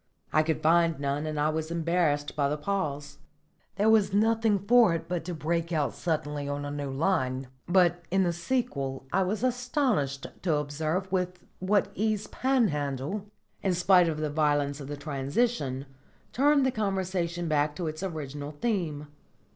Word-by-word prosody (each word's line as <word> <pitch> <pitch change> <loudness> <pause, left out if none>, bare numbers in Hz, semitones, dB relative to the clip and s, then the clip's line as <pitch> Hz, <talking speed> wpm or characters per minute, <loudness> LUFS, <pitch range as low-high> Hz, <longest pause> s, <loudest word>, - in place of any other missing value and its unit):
I 155 - +5
could 160 0 -1
find 165 -1 +4
none, 140 +2 -1
and 155 -1 -3
I 150 +1 +2
was 160 0 -2
embarrassed 165 -3 0
by 140 -2 +1
the 150 - -1
pause. 150 -4 -3 0.6
There 205 +3 +2
was 210 -3 +4
nothing 220 0 +3
for 210 -2 +5
it 165 0 -5
but 175 -2 -2
to 175 -1 -4
break 165 +2 -1
out 150 -4 0
suddenly 150 -3 -2
on 145 0 -3
a 145 - -4
new 145 -1 -4
line. 135 -4 0 0.2
But 175 -1 +3
in 190 +1 +3
the 175 -1 +1
sequel 165 - -2
I 190 - +3
was 195 +5 -1
astonished 245 - 0 0.2
to 170 -5 +1
observe 155 +6 -2
with 180 -1 -2
what 195 +2 +1
ease 215 0 0
Panhandle, 195 - -1 0.3
in 190 -2 +1
spite 180 0 +5
of 155 - -2
the 155 -1 -2
violence 145 -2 +1
of 140 - -7
the 145 0 -5
transition, 140 - -1 0.5
turned 280 +1 +4
the 260 - +2
conversation 185 -5 -1
back 150 -1 +1
to 175 - -3
its 155 +1 -4
original 145 -6 -5
theme. 160 -5 -2
165 Hz, 165 wpm, -28 LUFS, 145-195 Hz, 0.6 s, I